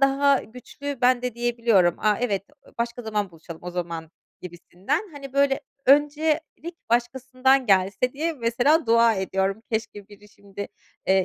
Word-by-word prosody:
daha 275 0 +3
güçlü 250 +4 -8
ben 250 -1 +3
de 250 -2 -3
diyebiliyorum. 235 -7 +2
"A, 210 -1 +2
evet, 205 -6 0 0.4
başka 235 +1 -3
zaman 210 -3 -2
buluşalım 165 0 -11
o 180 - -4
zaman." 170 -2 -5 0.3
gibisinden. 180 - -4
Hani, 275 -2 -9
böyle 275 0 +2 0.3
öncelik 305 +4 +1 0.2
başkasından 255 +2 +1
gelse 195 +5 +2
diye 320 +4 -2
mesela 260 +4 +2
dua 230 0 +5
ediyorum. 195 +2 -1
"Keşke 215 -2 -4
biri 210 0 -16
şimdi, 200 0 -9 0.4
eee, 190 -1 +3
235 Hz, 140 wpm, -24 LUFS, 195-270 Hz, 0.4 s, dua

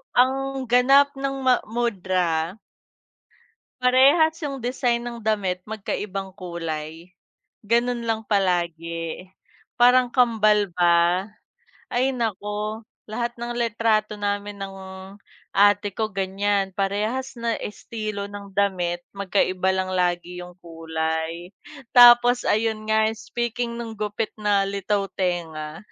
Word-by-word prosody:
ang 270 +1 +1
ganap 275 +3 +5
ng 275 0 -3
ma 255 -1 +4
mudra 185 -6 -1 1.2
parehas 275 +6 +5
'yung 275 -3 -4
design 245 -1 0
ng 235 -1 -6
damit, 190 -4 0
magkaibang 195 -2 -5
kulay. 165 -1 -6 0.5
Ganon 235 +2 +1
lang 225 -1 -2
palagi, 170 -2 -1 0.5
parang 250 0 +5
kambal 215 -5 +3
ba? 175 +3 +3 0.6
Ay, 255 +2 +1
naku 215 -1 -3 0.2
lahat 235 +2 -4
ng 240 0 -4
litrato 225 -2 0
namin 205 0 -3
ng 195 0 -6 0.8
ate 205 0 +3
ko 220 -1 -2
ganyan. 195 0 -1
Parehas 215 +7 -2
na 230 -1 -1
estilo 210 -1 -5
ng 200 -1 -9
damit, 185 -3 0
magkaiba 190 -1 +1
lang 185 0 -2
lagi 180 0 -1
'yung 180 0 -12
kulay. 165 +1 -4 0.4
Tapos 245 0 +8
ayun 220 0 0
nga, 220 0 +4
speaking 235 +1 -3
nung 225 -2 -6
gupit 210 +1 -3
na 205 -2 +1
litaw 200 0 -1
tenga, 160 -4 -3
205 Hz, 110 wpm, -23 LUFS, 185-235 Hz, 1.2 s, Tapos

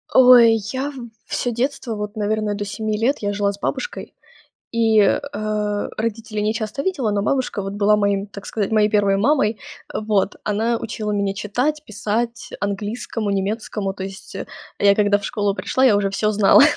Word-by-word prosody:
Ой, 245 -3 +8 0.2
я 270 +2 -2 0.4
всё 245 - -1
детство, 240 -1 -2
вот, 210 +1 -5
наверное, 215 0 -1
до 205 - -3
7 215 +1 -3
лет 245 +7 +1
я 205 -1 -2
жила 200 0 +1
с 200 - -11
бабушкой, - - -4 0.6
и, 225 -2 +3
э, 200 - +3 0.8
родителей 220 -1 -3
не 215 +1 +1
часто 225 +3 -3
видела, 275 - 0
но 205 -1 0
бабушка, 255 -1 0
вот, 195 0 -5
была 205 +1 +3
моим, 200 -1 +1
так 200 0 -10
сказать, 210 -2 -2
моей 215 -1 +4
1 200 -2 +3
мамой. 230 -1 +2 0.3
Э, - - -1
вот 210 -2 0
она 225 +3 +1
учила 215 -1 -4
меня 200 -1 0
читать, 250 +10 -1
писать, 230 +3 -2
английскому, 205 +2 -3
немецкому. 200 0 -2
То 190 - -6
есть, 195 +1 -9 0.4
я 200 0 +5
когда 205 -1 +3
в 205 - -12
школу 205 -4 0
пришла, 205 +7 0
я 230 -5 +6
уже 200 -1 +1
всё 210 +2 0
знала. 210 +4 +6
210 Hz, 175 wpm, -21 LUFS, 205-230 Hz, 0.8 s, Ой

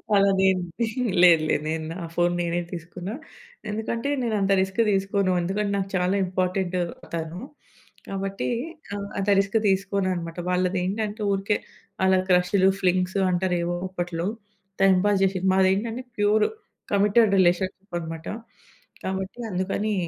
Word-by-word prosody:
అలా 200 0 +5
నేను 190 -1 +3 0.6
లేదు 165 -3 +7
లేదు. 150 - +1
నేను 160 0 -2
నా - - -7 0.2
ఫోను 175 0 +2
నేనే 170 0 -1
తీసుకున్నా. 175 +3 -6 0.6
ఎందుకంటే 230 +5 -2
నేను 225 -3 0
అంత 195 0 +1
రిస్క్ 190 +3 -3
తీసుకోను. 195 -1 +1
ఎందుకంటే 200 +3 -1
నాకు 195 0 -2
చాలా 180 +2 +1
ఇంపార్టెంట్ 185 0 -1 0.4
తను. 165 +1 -4 0.7
కాబట్టి 195 0 -3 0.5
ఆహ్, 200 0 -4
అంత 195 +1 -2
రిస్క్ 200 +3 +1
తీసుకోను 195 0 +1
అన్నమాట. 170 -1 -5
వాళ్ళది 180 0 +1
ఏంటంటే 210 +3 -2
ఊరికే 195 +2 +1 0.5
అలా 190 0 +4
క్రషులు, 185 +2 +4
ఫ్లింగ్స్ 185 +1 +1
అంటారు. 180 0 +1
ఏవో 175 +1 -1
అప్పట్లో 175 -2 -3 0.6
టైమ్ 195 -1 +6
పాస్ 205 -1 +3
చేసింది. 190 -1 +1
మాది 190 0 +4
ఏంటంటే 230 +5 -3
ప్యూర్ 210 +1 +3 0.5
కమిటెడ్ 210 +2 +4
రిలేషన్‌షిప్ 185 +1 +1
అనమాట. 160 0 -7 0.8
కాబట్టి 190 +4 -4
అందుకని 195 +3 -1
190 Hz, 135 wpm, -25 LUFS, 180-200 Hz, 0.8 s, లేదు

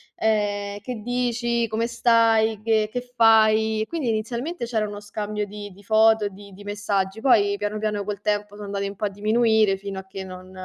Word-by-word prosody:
ehm: 205 -2 -1
"Che 245 +4 -6
dici? 240 0 0
Come 225 +2 -1
stai? 225 -2 +3
Che 220 -1 +2
che 245 +3 -3 0.2
fai?" 220 -1 +4
Quindi 315 0 -4
inizialmente 235 +8 -2
c'era 220 -3 -1
uno 205 0 -7
scambio 210 0 -4
di 205 0 -8
di 200 +2 -18
foto, 220 0 +4
di 200 0 -14
di 205 - -12
messaggi, 205 -1 -2
poi 205 -5 +3
piano 210 +1 -3
piano 210 -2 -2
col 205 -1 -5
tempo 205 0 -2
son 210 - -9
andati 200 0 -3
un 200 - -7
po' 210 - -3
a - - 0
diminuire 215 0 +2
fino 195 0 -6
a 190 - -10
che 190 0 -7
non 185 0 -10
215 Hz, 190 wpm, -23 LUFS, 205-225 Hz, 0.2 s, fai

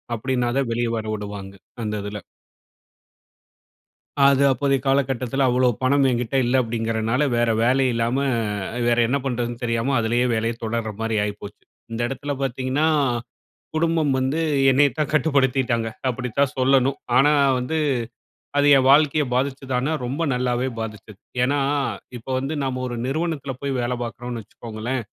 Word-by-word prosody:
அப்டினாதான் 125 +1 -1
வெளிய 120 0 0
வர 110 - -4
விடுவாங்க. 100 -2 -6 0.3
அந்த 105 0 -2
இதுல 105 +1 -5 2.1
அது 140 0 +4
அப்போதைய 135 +1 +1
காலகட்டத்துல 135 -1 +1
அவ்ளோ 125 0 +3
பணம் 140 +1 +3
என்கிட்ட 120 +2 -1
இல்ல 120 +2 0
அப்டிங்கிறனால, 115 +2 -1
வேற 120 0 +2
வேலை 130 +3 +3
இல்லாம, 115 +2 0 0.7
வேற 120 - +3
என்ன 140 +3 +1
பண்ணுறதுன்னு 120 -2 -3
தெரியாம 115 +3 0
அதுலே 120 +2 +1
வேலைய 115 +1 0
தொடர்றமாரி 110 -1 -2
ஆயிப்போச்சு. 105 0 -7 0.3
இந்த 115 - -3
இடத்துல 140 +2 -4
பார்த்தீங்கன்னா, 130 +4 0 0.9
குடும்பம் 160 -3 +1
வந்து 135 +5 0 0.3
என்னைய 140 +1 +4
தான் 150 - 0
கட்டுப்படுத்திட்டாங்க. 135 -6 +2 0.2
அப்டித்தான் 125 +2 -1
சொல்லணும். 135 +1 +3 0.2
ஆனா, 145 +3 +5 0.3
வந்து 125 +6 -2 0.8
அது 145 0 +4
என் 130 0 +2
வாழ்க்கைய 150 +1 +4
பாதிச்சுதானா, 135 +1 -1
ரொம்ப 140 +7 -2
நல்லாவே 125 0 0
பாதிச்சது. 105 -2 -7 0.3
ஏன்னா, 140 +3 +1 0.6
இப்ப 115 - -16
வந்து 135 +4 -3
நம்ம 130 -1 -2
ஒரு 120 - -4
நிறுவனத்தில 145 -1 -2
போய் 140 -1 -2
வேல 120 +1 -1
பார்க்குறோன்னு 120 +1 -5
வச்சுக்கோங்களேன். 115 +3 -5
125 Hz, 130 wpm, -22 LUFS, 115-135 Hz, 2.1 s, ஆனா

